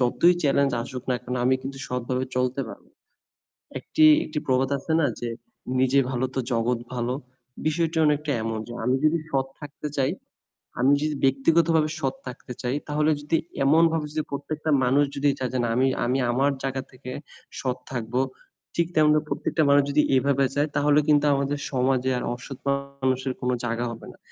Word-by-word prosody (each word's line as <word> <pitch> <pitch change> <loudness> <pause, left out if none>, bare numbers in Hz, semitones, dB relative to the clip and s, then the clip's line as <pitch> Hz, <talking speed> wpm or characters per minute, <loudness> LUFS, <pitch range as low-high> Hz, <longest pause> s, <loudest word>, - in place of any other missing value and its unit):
যতই 150 +8 +4
চেলেঞ্জ 140 -1 +2
আসুক 125 +1 -7
না 125 - +2
কেন 125 0 -4
আমি 130 - +4
কিন্তু 135 0 -6
সৎভাবে 125 +1 -2
চলতে 125 +1 0
পারব। 100 - -11 1.0
একটি, 155 - +3 0.2
একটি 155 -1 -3
প্রবাদ 130 0 +2
আছে 140 - -5
না - - +3
যে 120 - -3 0.5
"নিজে 130 +1 +4
ভালো 130 0 0
তো - - 0
জগৎ 115 +1 +1
ভালো" 120 0 -1 0.5
বিষয়টি 165 +1 0
অনেকটা 150 0 +1
এমনই। 110 -1 -3
যে 120 - -7
আমি 125 +2 +2
যদি 155 +2 +4
সৎ 135 -1 +1
থাকতে 150 0 -7
চাই, 135 -1 +2 0.7
আমি 135 +3 +5
যদি 155 0 0
ব্যক্তিগতভাবে 155 +4 +3
সৎ 135 -3 -1
থাকতে 125 0 -7
চাই 125 +2 -1
তাহলে 150 +1 +2
যদি 150 +3 0 0.3
এমনভাবে 160 +2 +4
যদি 155 0 -1
প্রত্যেকটা 155 +2 -3
মানুষ 135 +4 +4
যদি 140 +1 +1
চাই 130 - -1
যে 130 - -1
না - - 0
আমি, 130 - +3 0.2
আমি 125 +2 +1
আমার 135 +4 +2
জায়গা 135 -1 -2
থেকে 125 -1 -10 0.5
সৎ 130 -1 -2
থাকবো 120 0 -2 0.5
ঠিক 170 - +2
তেমন 155 -1 +5 0.2
প্রত্যেকটা 160 - 0
মানুষ 140 0 +6
যদি 150 +1 +4
এভাবে 135 +1 +2
চায় 145 +2 +1
তাহলে 145 0 +4
কিন্তু 150 -1 +4
আমাদের 140 +1 -1
সমাজে 130 0 +1
আর - - -4
অসৎ 130 +2 -9 0.4
মানুষের 130 0 0
কোন 125 - 0
জায়গা 120 0 -1
হবে 115 - -9
না। - - -20
135 Hz, 175 wpm, -25 LUFS, 125-150 Hz, 1.0 s, মানুষ